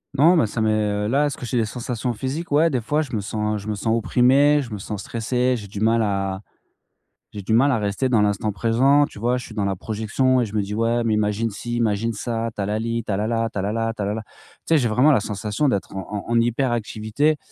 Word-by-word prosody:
Non, 165 Hz, +7 st, +5 dB
mais 160 Hz, -, +4 dB
ça 110 Hz, +2 st, -3 dB
m'est, 110 Hz, 0 st, +2 dB, 0.2 s
heu 105 Hz, 0 st, -1 dB
là, 140 Hz, +6 st, +2 dB
est-ce 145 Hz, -, -3 dB
que -, -, -7 dB
j'ai 120 Hz, -, -2 dB
des 115 Hz, -, +2 dB
sensations 120 Hz, +1 st, -3 dB
physiques? 135 Hz, +9 st, -4 dB
Ouais, 155 Hz, +3 st, +4 dB
des 130 Hz, -5 st, -1 dB
fois, 150 Hz, +7 st, 0 dB
je 145 Hz, -, -6 dB
me -, -, 0 dB
sens 105 Hz, +1 st, -2 dB
je 100 Hz, -, -10 dB
me 105 Hz, -, -1 dB
sens 110 Hz, +3 st, 0 dB
opprimé, 135 Hz, +6 st, +4 dB
je 130 Hz, -, -7 dB
me 105 Hz, -, -4 dB
sens 100 Hz, +1 st, -6 dB
stressé, 125 Hz, +3 st, 0 dB
j'ai 105 Hz, -, -8 dB
du 100 Hz, +1 st, -7 dB
mal 115 Hz, +2 st, +3 dB
à 100 Hz, -2 st, -1 dB, 0.9 s
j'ai 100 Hz, -, -7 dB
du 105 Hz, -, -2 dB
mal 135 Hz, +5 st, +4 dB
à 115 Hz, -, +1 dB
rester 105 Hz, +6 st, -1 dB
dans 115 Hz, -4 st, +3 dB
l'instant 105 Hz, +1 st, 0 dB
présent, 130 Hz, +7 st, +3 dB
tu -, -, -13 dB
vois? 120 Hz, +4 st, +1 dB
Je 125 Hz, -, -7 dB
suis 110 Hz, -, -11 dB
dans 105 Hz, -, 0 dB
la 100 Hz, 0 st, 0 dB
projection 110 Hz, +6 st, 0 dB
et -, -, +1 dB
je 105 Hz, -, -10 dB
me 105 Hz, -, +1 dB
dis: 100 Hz, +1 st, -5 dB
«Ouais, 115 Hz, +2 st, +1 dB
mais 115 Hz, -2 st, +1 dB
imagine 105 Hz, +2 st, 0 dB
ci, 120 Hz, +4 st, -5 dB
imagine 115 Hz, -1 st, 0 dB
ça, 115 Hz, +1 st, -3 dB
tu 105 Hz, -, -3 dB
as -, -, -1 dB
la 105 Hz, +1 st, -1 dB
li, 115 Hz, +1 st, -2 dB
tu 110 Hz, -, -7 dB
as 100 Hz, -, +1 dB
la 105 Hz, +2 st, -1 dB
la, 115 Hz, 0 st, 0 dB
tu -, -, -6 dB
as -, -, -1 dB
la 100 Hz, +2 st, -1 dB
la, 115 Hz, 0 st, -1 dB
tu 105 Hz, -, -6 dB
as -, -, 0 dB
la 100 Hz, +1 st, -1 dB
la». 110 Hz, -, -4 dB
Tu -, -, -27 dB, 0.4 s
sais, 165 Hz, -, +4 dB
j'ai 125 Hz, -4 st, +1 dB
vraiment 125 Hz, +7 st, +4 dB
la 140 Hz, -, +5 dB
sensation 105 Hz, +6 st, -2 dB
d'être 100 Hz, -4 st, -2 dB
en 100 Hz, +1 st, -5 dB
en 115 Hz, 0 st, +4 dB
hyperactivité 120 Hz, +3 st, 0 dB
115 Hz, 280 wpm, -22 LUFS, 105-125 Hz, 0.9 s, Non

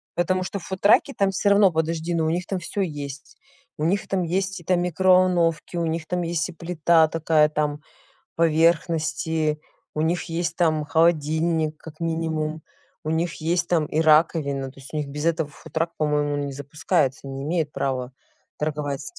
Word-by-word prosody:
Потому 185 Hz, +1 st, +1 dB
что 195 Hz, +2 st, -4 dB
в -, -, -14 dB
фудтраке 200 Hz, +8 st, +3 dB
там 195 Hz, -1 st, +2 dB
всё 200 Hz, +2 st, +1 dB
равно 200 Hz, -2 st, +5 dB
подожди, 160 Hz, +1 st, -1 dB
но 165 Hz, -1 st, +1 dB
у -, -, +1 dB
них 175 Hz, +3 st, -1 dB
там 190 Hz, -2 st, -3 dB
всё 185 Hz, +4 st, -4 dB
есть. 145 Hz, -5 st, -6 dB, 0.4 s
У 150 Hz, -, -3 dB
них 195 Hz, +4 st, 0 dB
там 190 Hz, -2 st, 0 dB
есть 190 Hz, +2 st, -2 dB
и -, -, -16 dB
там 175 Hz, +1 st, +1 dB
микроволновки, 180 Hz, -2 st, +2 dB
у 170 Hz, -, 0 dB
них 160 Hz, 0 st, -2 dB
там 180 Hz, 0 st, -1 dB
есть, 170 Hz, 0 st, -1 dB
и -, -, -8 dB
плита 165 Hz, -1 st, +3 dB
такая, 155 Hz, -2 st, +3 dB
там, 150 Hz, -1 st, -2 dB, 0.5 s
поверхности, 160 Hz, -2 st, +1 dB, 0.4 s
у 155 Hz, -, 0 dB
них 165 Hz, +3 st, 0 dB
есть 165 Hz, -1 st, -2 dB
там 155 Hz, -4 st, +1 dB
холодильник 160 Hz, 0 st, +1 dB
как 155 Hz, 0 st, -12 dB
минимум, 160 Hz, -1 st, -2 dB, 0.4 s
у 155 Hz, -, -3 dB
них 165 Hz, +1 st, 0 dB
есть 170 Hz, +2 st, 0 dB
там 165 Hz, -3 st, +2 dB
и 155 Hz, -, -1 dB
раковина, 150 Hz, -4 st, +2 dB
то 135 Hz, -, -17 dB
есть 135 Hz, +3 st, -13 dB
у 155 Hz, -, -2 dB
них 150 Hz, -, -2 dB
без 145 Hz, +2 st, -5 dB
этого 160 Hz, -3 st, +1 dB
фудтрак, 165 Hz, +3 st, -4 dB
по 155 Hz, -, +1 dB
моему, 145 Hz, -1 st, 0 dB
не 140 Hz, -1 st, -3 dB
запускается, 140 Hz, -1 st, -1 dB
не 135 Hz, 0 st, -6 dB
имеет 155 Hz, -1 st, -1 dB
права 130 Hz, -3 st, -2 dB, 0.5 s
торговать. 145 Hz, -2 st, -3 dB
160 Hz, 180 wpm, -24 LUFS, 150-175 Hz, 0.5 s, равно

